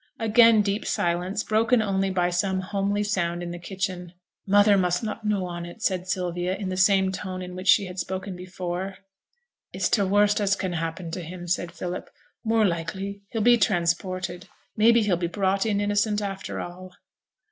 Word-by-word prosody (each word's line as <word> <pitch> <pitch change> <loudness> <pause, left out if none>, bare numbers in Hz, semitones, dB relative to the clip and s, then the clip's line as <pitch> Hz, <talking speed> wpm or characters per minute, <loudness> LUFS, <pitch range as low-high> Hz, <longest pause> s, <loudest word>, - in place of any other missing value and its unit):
Again 225 -1 +5
deep 200 +1 -1
silence, 180 +4 -1
broken 225 +3 +2
only 195 -2 0
by 180 -1 +1
some 190 +1 0
homely 200 +1 -1
sound 175 -4 -1
in 175 - -5
the 175 - -6
kitchen. 185 -1 -4 0.3
'Mother 205 +1 +5
must 180 -1 +1
not 215 0 -4
know 200 -3 +1
on 175 -1 -5
it,' 175 +6 -9
said 185 -2 0
Sylvia, 180 0 -1
in 195 -1 -4
the 185 - -2
same 190 0 +3
tone 185 -1 -5
in 180 0 -8
which 185 +1 -7
she 200 +1 +6
had 180 0 -7
spoken 190 +1 -4
before. 180 +1 -5 0.7
'It's - - -1
t' 210 - +2
worst 205 +2 +3
as 200 0 +2
can 190 -3 -3
happen 165 +1 -4
to 180 - -4
him,' 175 +1 -8
said 175 0 -1
Philip. 180 0 -5 0.3
'More 225 -1 +3
likely 195 +3 -3
he'll 225 - -2
be 240 +1 +6
transported: 185 -1 -1 0.3
maybe 230 +1 +5
he'll 195 -4 +1
be 175 0 -1
brought 195 +3 0
in 205 -2 +1
innocent 205 +1 +1
after 195 -2 -4
all.' 180 +1 -8
190 Hz, 180 wpm, -25 LUFS, 180-205 Hz, 0.7 s, she